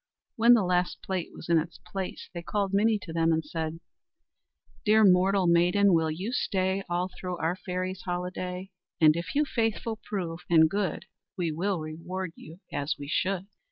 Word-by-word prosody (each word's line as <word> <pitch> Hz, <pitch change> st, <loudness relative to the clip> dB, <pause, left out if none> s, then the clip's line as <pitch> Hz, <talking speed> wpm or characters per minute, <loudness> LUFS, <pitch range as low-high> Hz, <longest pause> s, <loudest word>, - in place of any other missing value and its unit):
When 235 Hz, +2 st, +7 dB
the 220 Hz, -, +2 dB
last 180 Hz, 0 st, 0 dB
plate 185 Hz, -3 st, -2 dB
was -, -, -10 dB
in 170 Hz, -1 st, +4 dB
its 165 Hz, +2 st, -5 dB
place 190 Hz, -2 st, -6 dB
they 170 Hz, -, -5 dB
called 200 Hz, +2 st, -1 dB
Minnie 215 Hz, +2 st, +3 dB
to 165 Hz, -, -7 dB
them 165 Hz, 0 st, +2 dB
and 160 Hz, -1 st, +1 dB
said: 160 Hz, +1 st, -4 dB, 1.0 s
"Dear 215 Hz, 0 st, +5 dB
mortal 190 Hz, +1 st, +4 dB
maiden, 180 Hz, +3 st, +4 dB
will 160 Hz, -1 st, +3 dB
you 185 Hz, +9 st, -3 dB
stay 190 Hz, -5 st, 0 dB
All 175 Hz, +1 st, 0 dB
through 180 Hz, -1 st, -4 dB
our 165 Hz, +2 st, 0 dB
fairy's 185 Hz, 0 st, -4 dB
holiday? 180 Hz, +1 st, -4 dB, 0.3 s
And 155 Hz, -2 st, +6 dB
if 170 Hz, +6 st, -4 dB
you 300 Hz, +1 st, +3 dB
faithful 225 Hz, -3 st, -1 dB
prove, 175 Hz, -5 st, -4 dB
and 160 Hz, -2 st, +6 dB
good, 195 Hz, 0 st, -2 dB, 0.3 s
We 170 Hz, -3 st, 0 dB
will 180 Hz, +4 st, -1 dB
reward 165 Hz, +4 st, -5 dB
you 165 Hz, +5 st, -13 dB
as 145 Hz, +1 st, -1 dB
we 140 Hz, -, -7 dB
should." 190 Hz, +2 st, 0 dB
180 Hz, 175 wpm, -28 LUFS, 165-195 Hz, 1.0 s, When